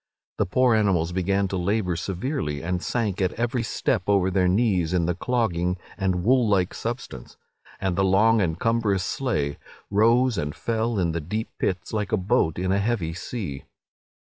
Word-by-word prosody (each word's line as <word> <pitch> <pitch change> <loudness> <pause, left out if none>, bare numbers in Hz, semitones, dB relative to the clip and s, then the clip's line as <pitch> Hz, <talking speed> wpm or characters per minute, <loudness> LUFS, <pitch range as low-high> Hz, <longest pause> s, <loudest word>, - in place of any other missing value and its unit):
The - - +2
poor 125 +5 +3
animals 95 -6 +2
began 95 +2 +1
to 95 - -2
labour 90 0 0
severely, 90 - -3
and 90 +1 -2
sank 105 -6 -1
at 95 - +1
every 120 +1 -1
step 115 -2 0
over 95 -2 +3
their 90 0 +2
knees 90 -4 +2
in 85 -2 +2
the 90 - +1
clogging 90 -4 0 0.2
and 95 -3 -1
wool 125 0 +3
like 95 -3 +2
substance; 115 - -6 0.4
and 95 -2 -1
the 95 - +2
long 105 +4 +4
and 85 -3 -1
cumbrous 115 -5 +1
sleigh 75 - -2 0.3
rose 115 +3 +3
and 75 0 -3
fell 115 0 -1
in 85 -3 +1
the 85 0 -3
deep 105 +9 -3
pits 95 +3 -2
like 105 -2 -2
a 110 - +3
boat 90 -4 +1
in 95 +1 -1
a 100 - +2
heavy 100 -6 -1
sea. 90 - -6
95 Hz, 175 wpm, -25 LUFS, 90-115 Hz, 0.4 s, long